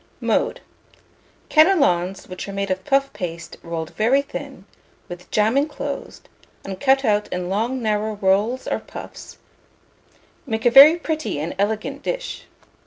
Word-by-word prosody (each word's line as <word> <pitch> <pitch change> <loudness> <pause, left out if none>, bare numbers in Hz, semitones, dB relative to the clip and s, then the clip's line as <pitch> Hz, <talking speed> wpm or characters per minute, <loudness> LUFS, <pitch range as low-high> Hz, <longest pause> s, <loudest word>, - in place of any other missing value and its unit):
Mode. - - 0 0.9
Cannelons 275 - +3
which 185 +1 -7
are - - -6
made 195 -1 -2
of 185 0 -2
puff 275 0 +1
paste 170 -2 -6
rolled 165 -1 -5
very 255 +6 +2
thin, 275 -7 -8 0.4
with 175 0 -10
jam 215 +3 +2
inclosed, 285 0 -3 0.4
and 190 -1 -7
cut 270 0 +3
out 210 -1 +1
in 180 0 -4
long 230 +6 -1
narrow 215 0 -1
rolls 205 +6 +1
or - - -1
puffs, - - -11 1.1
make 225 -1 -3
a 240 - +5
very 280 +6 +10
pretty 310 - -3
and 155 +3 -3
elegant 215 +2 -2
dish. - - -5
215 Hz, 140 wpm, -21 LUFS, 190-275 Hz, 1.1 s, very